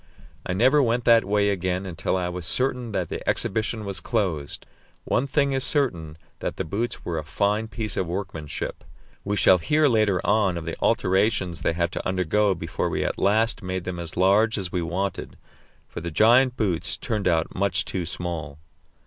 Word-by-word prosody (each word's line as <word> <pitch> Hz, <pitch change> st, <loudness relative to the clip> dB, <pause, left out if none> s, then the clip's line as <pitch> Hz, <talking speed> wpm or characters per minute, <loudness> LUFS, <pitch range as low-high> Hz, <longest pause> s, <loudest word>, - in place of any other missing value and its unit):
I -, -, -1 dB
never 130 Hz, +9 st, +4 dB
went 120 Hz, -1 st, +1 dB
that 115 Hz, -1 st, +6 dB
way 100 Hz, 0 st, +2 dB
again 95 Hz, 0 st, -2 dB
until 90 Hz, 0 st, -2 dB
I 90 Hz, -1 st, -1 dB
was 90 Hz, -1 st, -5 dB
certain 125 Hz, -2 st, 0 dB
that 90 Hz, -5 st, -2 dB
the -, -, -4 dB
exhibition 110 Hz, +1 st, -1 dB
was 100 Hz, -1 st, -3 dB
closed. 90 Hz, -, -2 dB, 0.4 s
One 135 Hz, -, 0 dB
thing 140 Hz, 0 st, +1 dB
is 135 Hz, -1 st, 0 dB
certain, 85 Hz, -, 0 dB, 0.2 s
that -, -, -3 dB
the -, -, -2 dB
boots 115 Hz, +9 st, -3 dB
were 85 Hz, -2 st, -2 dB
a -, -, -5 dB
fine 105 Hz, +8 st, 0 dB
piece 110 Hz, -2 st, -4 dB
of 90 Hz, -, 0 dB
workmanship. 85 Hz, -4 st, -5 dB, 0.4 s
We 105 Hz, +1 st, -1 dB
shall 95 Hz, -1 st, +5 dB
hear 150 Hz, -, +3 dB
later 110 Hz, -6 st, +2 dB
on 100 Hz, -4 st, +2 dB
of 80 Hz, -, -6 dB
the 85 Hz, -, -4 dB
alterations 95 Hz, -2 st, +1 dB
they -, -, +1 dB
had 85 Hz, 0 st, -1 dB
to -, -, -4 dB
undergo 95 Hz, +2 st, +1 dB
before 80 Hz, -1 st, -3 dB
we -, -, -1 dB
at -, -, -2 dB
last 110 Hz, +4 st, +2 dB
made 95 Hz, -1 st, -3 dB
them 90 Hz, -1 st, -5 dB
as 85 Hz, -1 st, -6 dB
large 100 Hz, +5 st, +4 dB
as 95 Hz, -4 st, -3 dB
we 90 Hz, -, -1 dB
wanted, 90 Hz, +4 st, -3 dB, 0.5 s
for -, -, -7 dB
the 85 Hz, -, -4 dB
giant 125 Hz, +8 st, +4 dB
boots 95 Hz, -7 st, -1 dB
turned 105 Hz, -4 st, -2 dB
out 80 Hz, -2 st, +1 dB
much 100 Hz, +1 st, 0 dB
too 90 Hz, -3 st, -3 dB
small! 80 Hz, -5 st, -5 dB
95 Hz, 190 wpm, -24 LUFS, 85-110 Hz, 0.5 s, that